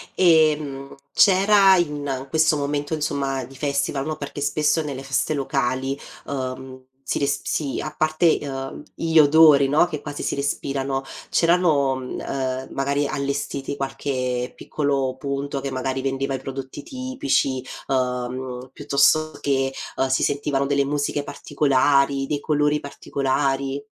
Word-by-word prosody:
Ehm, 150 -5 +3 0.2
c'era, 195 0 +6
in 145 -5 -2
questo 160 +1 +3
momento, 145 +1 -2
insomma, 140 -4 -1
di 135 +2 -14
festival 140 0 -1
no, 155 0 -3
perché 145 -1 -6
spesso, 150 +2 +1
nelle 140 -3 -5
feste 135 +2 0
locali, 135 -1 -1 0.3
uhm 130 -1 -5 0.2
si - - 0
resp 140 0 -1
si 140 -4 -2
a 155 - -5
parte, 155 +2 +2
uhm, 135 -1 -5
gli 165 -1 +3
odori, 150 -2 +7
no, 150 +4 +4
che 155 -4 -5
quasi 145 -1 -6
si - - -1
respirano, 135 -1 -2 0.3
c'erano, 165 -6 +3
mhmm, 130 -1 -7
uhm, 130 -1 -3
magari, 140 +1 0
allestiti 140 0 -3
qualche 130 -2 -2
piccolo 140 -3 -1
punto 140 0 -3
che, 140 - -3
magari, 130 0 -2
vendeva 135 0 -2
i 135 - -2
prodotti 135 +1 -7
tipici, 255 - -1 0.3
uhm, 125 0 -2
piuttosto 155 +4 +2
che, 135 -1 0 0.4
si 130 - +1
sentivano 140 -1 0
delle 140 0 +2
musiche 145 +1 -1
particolari, 140 -1 +2
dei 145 +1 -2
colori 150 0 +1
particolari? 140 0 -2
140 Hz, 135 wpm, -23 LUFS, 135-150 Hz, 0.4 s, odori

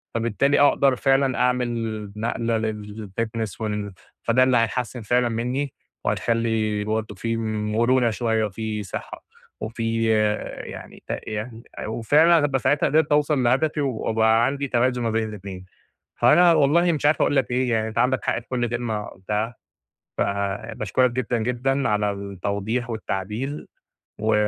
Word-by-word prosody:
فبالتالي 120 +5 +2
أقدر 140 -2 +4
فعلًا 135 -1 +2
أعمل 115 -4 -1
نقلة 115 0 -1
للfitness 110 0 -5
وال 105 -2 -3 0.3
فده 120 +2 +4
اللي 130 -1 +4
هيحسِّن 120 +2 -1
فعلًا 120 +3 +2
مني 125 +4 -2 0.3
وهيخلي 110 -2 0
برضه 110 0 -2
في 115 +4 -2
مرونة 115 +3 +1
شوية 110 -1 0
وفي 105 +1 -4
صحة 95 - -7 0.4
وفي 115 +1 -1 0.6
يعني - - -10
ت - - -4 0.2
يعني 110 +2 -5 0.2
آآ - - -4
وفعلًا 150 +9 +4
ابقي 135 -2 0
ساعتها 145 +3 +2
قدرت 155 +2 +2
أوصل 150 -2 +3
لهدفي، 145 +5 +2
وأبقى 115 -3 +2
عندي 140 +1 -1
توازن 125 0 +1
ما 115 - +1
بين 110 0 0
الإتنين، 95 -3 -8 0.5
فأنا 175 +1 +6
والله 165 +3 +4
مش 150 -3 -2
عارف 150 +1 +3
أقول - - +2
لَك 130 -3 +1
إيه 125 0 +1
يعني 110 -1 +1
أنتَ 110 - -9
عندك 125 +2 +1
حق - - +1
في 120 - -19
كل 120 -2 -1
كلمة 115 -3 -2
قُلتها، 105 +5 -3 0.6
فباشكرك 105 +4 0
جدًا، 125 0 -1
جدًا 125 +4 0
على 105 -1 +1
التوضيح 100 +4 -3
والتعديل 110 +5 -4 0.5
و 110 +1 +1
115 Hz, 140 wpm, -23 LUFS, 110-130 Hz, 0.6 s, فأنا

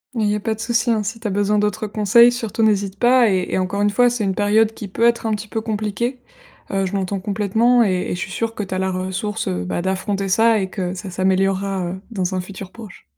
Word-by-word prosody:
Il 225 - 0
y 205 - +1
a - - -2
pas 220 +1 -2
de 220 - -19
souci, 235 0 0
hein, 220 -2 +1
si 220 +3 -5
tu 225 - -4
as - - -2
besoin 205 +1 +1
d'autres 210 0 -1
conseils, 215 +3 +5
surtout 230 -2 -2
n'hésite 200 -2 +1
pas 245 -1 +5
et 185 -2 0
et - - +2
encore 185 +2 -1
une 205 - +3
fois, 245 +3 +4
c'est 240 -3 -2
une 190 -1 0
période 215 +2 +3
qui 210 - -7
peut 195 - -3
être 235 -1 +2
un - - 0
petit 210 +1 -4
peu 220 +1 -3
compliquée. 220 +3 -2 0.5
Heu, 195 -1 0
je - - -7
l'entends 195 0 -2
complètement 220 +5 +2
et 185 -3 0
et - - -1
je - - -7
suis 190 - -5
sûre 225 +4 -3
que 210 - -3
tu 190 - -6
as 185 - -1
la 190 0 0
ressource, 190 +3 -3
heu, 90 -1 -2
bah, 175 - -2
d'affronter 195 +1 -1
ça 225 +2 +4
et 190 - -1
que 185 -2 -3
ça 190 +1 -7
s'améliorera, 190 0 0
heu, 190 +1 -7
dans 185 -3 -2
un 185 - -1
futur 190 0 -9
proche. 220 -5 -12
205 Hz, 265 wpm, -20 LUFS, 190-225 Hz, 0.5 s, conseils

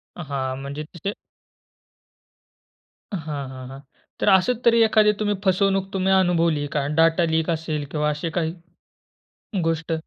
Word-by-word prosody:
हां, 135 -5 -3
म्हणजे 140 +2 -5
तसे 170 +5 -5 2.0
हां, 150 -6 -4
हां, 130 -1 -9
हां. 135 +1 -9 0.4
तर - - -1
असच 220 +6 +3
तरी 230 -1 +5
एखादी 215 -1 +4
तुम्ही 205 -1 0
फसवणूक 195 0 +2
तुम्ही 190 0 +1
अनुभवली 170 -4 +3
आहे 145 - -3
का? 140 - 0
डाटा 165 +1 +4
लीक 160 +1 0
असेल 155 -3 -2
किंवा 150 -1 0
असे 150 +3 -3
काही 160 -1 -1 1.1
गोष्ट? 165 0 -1
165 Hz, 135 wpm, -23 LUFS, 150-190 Hz, 2.0 s, तरी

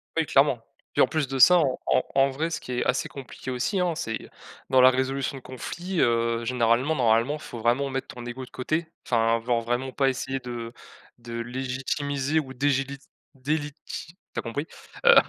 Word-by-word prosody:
Oui - - +2
clairement. - - +3 0.3
Puis - - +3
en - - +4
plus 155 -3 0
de 135 +1 -3
ça, 180 +7 +8
en 135 -5 +1
en - - +3
en 135 0 +5
vrai, 160 +5 -1
ce 165 - -3
qui 125 - -8
est 120 - 0
assez 125 - +1
compliqué 130 -1 -8
aussi, 135 +11 0
hein, 175 -2 +1
c'est 115 -5 -4 0.4
dans 130 -1 +6
la 130 - +9
résolution 135 +1 -1
de - - -10
conflits, 175 +8 -5
heu, 115 0 +2
généralement, 125 +5 +2
normalement 120 +3 +3
il - - -8
faut 120 - -8
vraiment 125 +5 +2
mettre 135 0 -3
ton 120 -1 -9
ego 125 +2 -6
de - - -17
côté. 155 +6 -2 0.2
Enfin, 115 -1 +2
ven 120 0 +1
vraiment 120 +3 -1
pas 135 +1 +2
essayer 135 +1 -2
de 120 -2 -6 0.5
de 120 0 -9
légitimiser 135 +4 -1
ou 135 -4 -5
délégi 135 +1 0 0.4
délégiti 150 +4 -4 0.2
tu - - -2
as - - -1
compris, 140 +7 -3 0.4
heu, 475 0 +9
130 Hz, 195 wpm, -26 LUFS, 120-145 Hz, 0.5 s, la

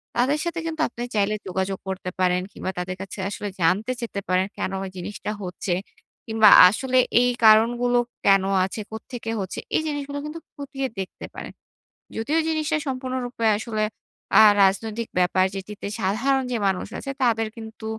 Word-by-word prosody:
তাদের 275 +5 +2
সাথে 340 0 -3
কিন্তু 320 -1 -3
আপনি 240 - -10
চাইলে 210 +1 +2
যোগাযোগ 190 +1 -2
করতে 190 -1 -4
পারেন 180 -1 +2
কিংবা 190 - -4
তাদের 180 +1 -3
কাছে 195 - -8
আসলে 205 0 -5
জানতে 195 +9 +2
চেতে 230 -4 -4
পারেন, 185 +1 +2
কেন 190 - -2
ওই 190 - -5
জিনিসটা 205 +3 -5
হচ্ছে? 180 0 -3 0.6
কিংবা 220 -1 +6 0.2
আসলে 255 +5 -1 0.2
এই 245 - +3 0.2
কারণগুলো 240 +3 +5 0.3
কেন 195 -1 +5 0.2
আছে? 195 +3 -5
কোত্থেকে 225 +1 -7
হচ্ছে? 190 -2 -4 0.2
এই - - +3
জিনিসগুলো 285 -1 -4
কিন্তু 305 +2 -6 0.2
খতিয়ে 270 -1 -4
দেখতে 190 - -6
পারেন। - - -7 0.6
যদিও 285 +9 0
জিনিসটা 315 -1 0
সম্পূর্ণরূপে 255 -2 -3
আসলে 215 -1 -2 0.5
অ্যা - - +9 0.2
রাজনৈতিক 220 +4 0
ব্যাপার 180 +1 +3
যেটিতে 200 +1 -6
সাধারণ 265 +8 +1
যে 240 - 0
মানুষ 190 -2 -1
আছে 275 - -5
তাদের 225 -2 +2
কিন্তু 220 0 -9
220 Hz, 155 wpm, -24 LUFS, 190-255 Hz, 0.6 s, অ্যা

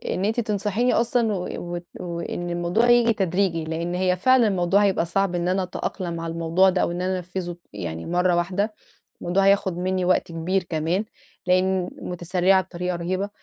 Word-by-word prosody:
إن 185 - -1
أنتِ 225 +3 0
تنصحيني 215 +2 0
أصلًا 230 -2 +2
و 180 -2 -3 0.3
وت 175 0 -6
وإن 175 0 -4
الموضوع 175 +7 +1
ييجي 240 -1 +5
تدريجي 185 -4 0
لأن 165 +2 -3
هي 180 0 +2
فعلًا 255 +4 +4
الموضوع 190 +1 +2
هيبقى 190 -4 +2
صعب 185 +1 0
إن 175 0 -1
أنا 185 +1 +1
أتأقلم 180 -1 -4
على 165 0 -4
الموضوع 170 +3 +3
ده 185 0 +1
أو - - 0
إن 175 +1 -3
أنا 185 +1 0
أنَفّذه 180 -1 -5 0.2
يعني 85 -5 -5
مرة 180 0 +2
واحدة، 185 +5 0 0.5
الموضوع 190 +3 +1
هياخد 195 -3 +3
منّي 185 0 -1
وقت 180 -1 +1
كبير 175 +3 -1
كمان 170 +4 -1 0.4
لإن 185 0 +2
مُتسرعة 180 +2 +1
بطريقة 180 -1 -4
رهيبة، 185 +4 -2
180 Hz, 175 wpm, -24 LUFS, 175-195 Hz, 0.5 s, ييجي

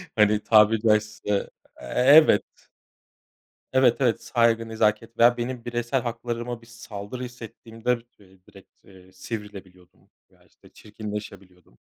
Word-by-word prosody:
hani, 105 -1 +3
tabiri 110 0 +4
caizse, 105 -2 0 0.3
e - - -9
evet. 135 - +5 1.3
Evet, 130 -2 +4
evet 120 -4 +1
saygı, 115 -2 +1
nezaket 110 +1 -1
veya 120 +1 +5
benim 120 0 -5
bireysel 120 +2 -2
haklarıma 120 0 -5
bir - - -17
saldırı 115 0 -9
hissettiğimde 120 0 -5 0.5
direkt, 95 - -18
eee, 95 -1 -18
sivrilebiliyordum 95 -3 -10 0.2
veya, - - -27
işte, - - -23
çirkinleşebiliyordum. 100 - -10
115 Hz, 110 wpm, -24 LUFS, 105-120 Hz, 1.3 s, evet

